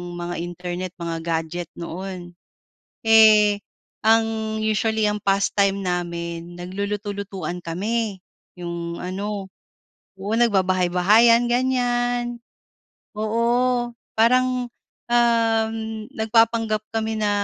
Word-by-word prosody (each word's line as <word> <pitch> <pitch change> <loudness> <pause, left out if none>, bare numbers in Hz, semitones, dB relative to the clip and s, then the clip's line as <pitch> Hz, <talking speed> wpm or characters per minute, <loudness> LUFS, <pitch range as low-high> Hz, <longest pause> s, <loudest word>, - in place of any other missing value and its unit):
mga 175 0 -4
internet, 175 +1 -5
mga 170 -1 -4
gadget 165 +1 -3
noon. 175 +1 -7 0.7
Eh, 215 -2 +6 0.5
ang 225 0 +5 0.4
usually 220 0 +1
ang 210 - -2
pastime 200 0 +2
namin 170 -1 -4
nagluluto-lutuan 195 -1 -4
kami, 205 +4 -2 0.4
yung 170 -1 -5
ano 195 +1 -4 0.7
oo 200 +3 -3
nagbabahay-bahayan 200 +2 +4
ganyan. 245 -1 0 0.8
Oo. 240 +3 +1 0.2
Parang, 250 +2 +2 0.4
um, 230 -2 +3 0.4
nagpapanggap 225 -1 +2 0.2
kami 220 0 -1
na 210 -1 +1
205 Hz, 85 wpm, -23 LUFS, 180-230 Hz, 0.8 s, Eh